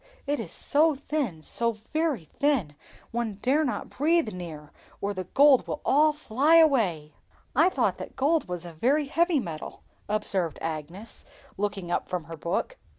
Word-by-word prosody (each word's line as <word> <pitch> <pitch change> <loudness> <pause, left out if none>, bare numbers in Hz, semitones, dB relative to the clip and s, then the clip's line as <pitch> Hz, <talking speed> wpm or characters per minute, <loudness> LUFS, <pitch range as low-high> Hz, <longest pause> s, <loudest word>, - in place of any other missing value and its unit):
it 290 0 -1
is - - -6
so 305 +1 +2
thin, 270 - -3
so 235 +6 0 0.2
very 310 - 0
thin, 265 - 0 0.4
one 230 -3 -2
dare 265 +9 +1
not 260 - -2
breathe 310 -3 +1
near, 160 -5 -8 0.3
or 200 +1 -2
the 185 -1 -5
gold 280 -2 +6
would - - -2
all 305 +3 +5
fly 295 +1 +2
away!" 210 - +3 0.4
"I 325 +7 +5
thought - - 0
that - - -8
gold 300 +1 +1
was 180 -1 -5
a 170 - -8
very 275 - +1
heavy 330 +2 +2
metal," 165 -9 -7 0.3
observed 195 -6 -1
Agnes, 165 +7 -6 0.3
looking 200 -3 -3
up - - -1
from 180 -2 -2
her 165 +1 -8
book. 170 - -3
235 Hz, 160 wpm, -27 LUFS, -, 0.4 s, gold